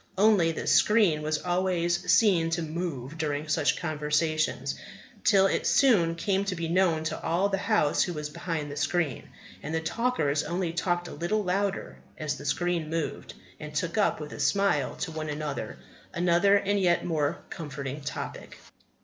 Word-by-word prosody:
Only, 195 -5 +4
the 160 - -5
screen 205 -8 +4
was 155 0 -2
always 175 -1 0
seen 180 -7 +4
to 165 0 -1
move 160 -3 -5
during 150 -1 -2
such 155 - +1
conversations, 155 -1 0 0.5
till 195 -3 +5
it 195 - +1
soon 185 -12 +4
came 195 +3 0
to 195 -2 -2
be 165 -1 -3
known 170 -2 +2
to 160 0 -3
all 175 +5 +1
the 195 -1 -1
house 205 -9 +2
who 180 - 0
was 150 -1 -4
behind 155 -3 -4
the - - -6
screen. 150 -1 -1 0.3
And 155 +2 -4
the - - +1
talkers 160 - 0
only 170 +1 -2
talked 175 0 -1
a - - -8
little 210 +5 -1
louder 195 +1 -2 0.2
as 150 -1 -2
the 140 - -10
screen 170 +2 -1
moved, 165 -1 -4 0.2
and 150 0 -8
took 165 +2 -1
up, 210 - +2
with 150 -1 -7
a - - -8
smile 200 0 +1
to 170 - -4
one 155 -1 -4
another, 150 0 -4 0.4
another 175 +3 +4
and 205 0 +1
a - - -1
yet 175 -2 +2
more 155 -2 0
comforting 140 -2 -6
topic. 140 - -6
165 Hz, 175 wpm, -27 LUFS, 155-185 Hz, 0.5 s, till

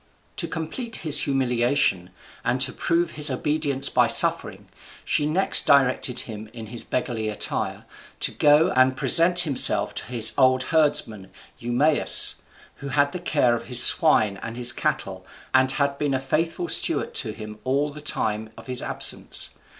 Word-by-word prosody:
To - - -1
complete 220 +9 -7
his 150 -2 +3
humiliation, 125 -7 -1 0.3
and 125 +2 -2
to 130 -1 +1
prove 170 +1 -2
his 150 0 +2
obedience 140 0 0
by - - +1
suffering, - - +3 0.4
she 150 - -1
next 180 +6 0
directed 130 -2 +1
him 110 -1 -10
in 115 -2 -10
his 120 - -4
beggarly 115 -3 -5
attire 105 - -4 0.4
to - - 0
go 150 +2 +2
and 130 0 +1
present 175 +4 +5
himself 145 -7 +2
to - - -6
his 115 -3 +5
old 130 -1 +2
herdsman 135 - -1 0.3
Eumaeus, 125 +6 +3 0.4
who 140 - -10
had 145 +1 -1
the 180 - -6
care 145 -8 -1
of 115 - -8
his 125 -2 +5
swine 110 - +3
and 115 +1 -8
his 125 -1 +5
cattle, - - -5 0.3
and 130 0 +2
had 140 -1 -3
been 145 -2 -2
a - - -2
faithful 165 - -4
steward 475 +6 0
to 450 - -3
him 105 -1 -11
all 140 +4 -2
the 150 - -12
time 110 -6 -4
of - - -14
his 125 -1 -2
absence. - - 0
135 Hz, 160 wpm, -22 LUFS, 120-150 Hz, 0.4 s, present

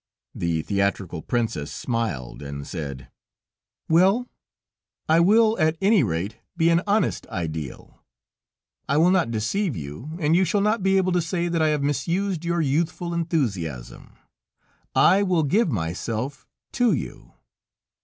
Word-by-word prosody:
The 85 -2 -1
theatrical 100 -4 -1
princess 115 -11 -2
smiled, 110 - -3
and 70 0 -6
said: 70 -7 -7 0.8
"Well, 190 +9 +3 0.8
I 160 +1 +4
will 220 +5 +4
at 155 +1 +2
any 200 0 +4
rate 90 +7 -2 0.2
be 165 0 +4
an 170 +1 +3
honest 210 +2 +1
ideal; 80 -5 -6 0.9
I 140 - +2
will 170 +4 +5
not 185 -9 +2
deceive 120 - -1
you, 80 - -7
and 155 0 +2
you 185 - +4
shall 190 +4 +1
not 210 +1 +1
be 195 +1 +3
able 185 -1 +2
to 180 0 +2
say 170 +1 -2
that 170 -1 0
I 155 - +4
have 150 -2 0
misused 170 +5 -1
your 170 0 0
youthful 170 +4 -1
enthusiasm. 105 - -3 0.8
I 195 - +5
will 180 -5 +2
give 185 +7 +2
myself 110 - -3 0.2
to 245 -3 +2
you...." - - -6
155 Hz, 140 wpm, -24 LUFS, -, 0.9 s, will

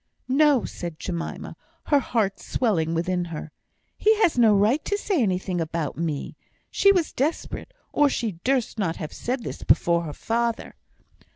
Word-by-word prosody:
"No!" 275 -1 +4
said 170 -3 -6
Jemima, 170 -1 -5 0.3
her 290 - +3
heart 215 -7 -1
swelling 165 -9 0
within 175 +1 0
her. 160 -2 -7 0.4
"He 435 0 +3
has 335 - +3
no 225 -4 +5
right 220 +9 +3
to 405 - -1
say 395 -7 0
anything 185 -3 0
about 165 -2 -3
me." 160 -3 -3 0.4
She 395 - +5
was 360 -5 +1
desperate, 310 - -2 0.2
or 290 -1 +4
she 215 -10 -3
durst 255 -4 0
not 170 -5 0
have 155 - -6
said 250 0 -3
this - - -6
before 170 0 +3
her 150 - -5
father. 230 +4 -2
215 Hz, 160 wpm, -25 LUFS, 170-270 Hz, 0.4 s, no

